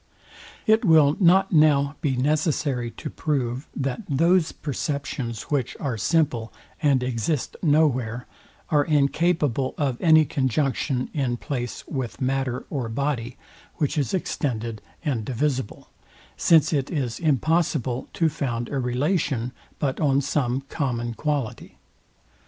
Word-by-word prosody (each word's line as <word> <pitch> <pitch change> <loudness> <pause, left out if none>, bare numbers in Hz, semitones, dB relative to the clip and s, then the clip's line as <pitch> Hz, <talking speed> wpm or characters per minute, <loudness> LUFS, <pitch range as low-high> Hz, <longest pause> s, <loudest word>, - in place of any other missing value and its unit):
It 220 +1 +4
will 155 -6 +5
not 190 +1 +5
now 150 -3 +4
be 140 -6 0
necessary 145 -2 0
to 150 - -8
prove, 130 -3 -2
that 135 - -2
those 165 +4 +3
perceptions, 140 -5 -4
which 140 -5 -1
are 135 -5 -2
simple, 120 -2 +1 0.3
and 140 -4 +3
exist 125 +3 -2
no 155 -1 +4
where, 125 -3 -2 0.5
are 150 -2 +4
incapable 150 -2 +1
of 135 -5 -1
any 160 -2 +6
conjunction 135 -1 0
in 130 -5 -1
place 125 -2 -4
with 130 -5 -4
matter 130 -1 -1
or 130 -6 -2
body, 125 -1 -2 0.4
which 145 0 -1
is 145 -4 0
extended 115 - -2 0.2
and 130 -7 0
divisible; 130 0 -2 0.5
since 160 -1 +4
it 140 -2 0
is 130 -8 -2
impossible 150 -4 +1
to 165 - +2
found 120 -6 -2
a 140 - -2
relation 130 -1 0 0.3
but 135 -3 -1
on 140 -3 +3
some 135 -2 0
common 120 -4 -3
quality. 145 -2 -3
140 Hz, 125 wpm, -24 LUFS, 125-155 Hz, 0.5 s, any